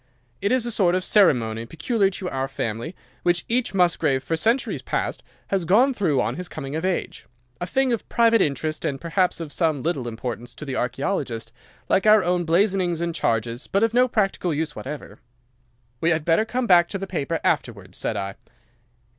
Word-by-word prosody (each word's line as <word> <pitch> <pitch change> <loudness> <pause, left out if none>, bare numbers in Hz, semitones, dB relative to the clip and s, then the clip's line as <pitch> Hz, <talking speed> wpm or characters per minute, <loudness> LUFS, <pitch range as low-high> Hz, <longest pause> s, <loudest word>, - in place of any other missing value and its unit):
It 200 - +1
is 255 -2 +2
a 240 - -2
sort 180 -5 +2
of 185 - 0
ceremony 115 - +3
peculiar 195 - +1
to 190 -1 -6
our 135 0 -1
family, 120 - -4 0.3
which 175 -1 +1
each 235 -4 0
Musgrave 160 -7 +2
for 165 +4 -1
centuries 230 +10 0
past - - -2 0.3
has 195 -2 0
gone 230 +11 +4
through 175 - +1
on - - -1
his 180 0 -6
coming 140 -1 -6
of 160 - -2
age—a 125 -5 -5
thing 265 +5 +2
of 230 - -4
private 230 -2 +4
interest, 155 +1 -1
and 135 -2 -2
perhaps 175 +3 0
of 160 -3 -6
some 155 -6 0
little 150 -7 -1
importance 120 +1 -5
to 150 - -8
the 135 -2 -4
archaeologist, 125 - -2 0.4
like 195 - +2
our 215 -2 +7
own 175 0 +1
blazonings 180 0 +2
and 170 0 -2
charges, 115 -5 -1
but 195 +3 +1
of 225 0 +2
no 250 +1 +4
practical 195 -6 0
use 155 0 -2
whatever.' 145 +2 -7 0.8
"'We 165 - +3
had 160 -2 +1
better 170 +6 +3
come 250 +2 -1
back 175 -4 +5
to 195 - -3
the 195 - -4
paper 165 -3 -2
afterwards,' 115 - -2
said 110 - -2
I. 100 -1 -3
170 Hz, 190 wpm, -23 LUFS, 135-195 Hz, 0.8 s, our